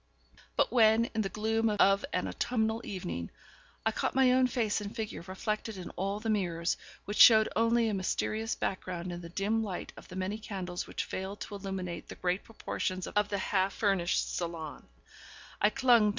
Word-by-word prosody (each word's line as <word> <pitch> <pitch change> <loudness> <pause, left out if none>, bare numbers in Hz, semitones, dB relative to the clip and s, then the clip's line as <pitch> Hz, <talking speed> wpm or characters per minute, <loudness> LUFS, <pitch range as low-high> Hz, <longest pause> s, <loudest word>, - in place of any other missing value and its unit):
But - - +2
when, 230 -1 +5
in 225 - +1
the 195 - -1
gloom 225 +2 +1
of 200 -1 +4
an - - 0
autumnal 225 -2 0
evening, 85 - -4 0.6
I - - +3
caught - - -1
my 265 -1 +5
own 255 0 +5
face 225 -4 0
and 205 +1 -6
figure 220 -3 -4
reflected 215 +2 -3
in 180 - -7
all 195 +2 -2
the 225 - -5
mirrors, 175 -5 0 0.3
which 205 - -4
showed 220 -2 +9
only 230 +1 +3
a 215 - 0
mysterious 215 +3 -1
background 180 -2 -3
in 175 0 -5
the 170 - -8
dim 205 +5 0
light 190 -5 -5
of - - -12
the 180 - -10
many 190 +3 -2
candles 185 -5 -5
which - - -3
failed 190 +2 -5
to - - -6
illuminate 190 -3 -5
the - - -7
great 180 +2 -1
proportions 185 -4 -3
of 210 0 0
the 200 - -1
half 190 0 +1
furnished 195 -5 +1
salon, 165 -3 -5 0.7
I 210 - +6
clung 250 0 +5
to 210 - +3
M. - - +3
205 Hz, 190 wpm, -31 LUFS, 185-220 Hz, 0.7 s, showed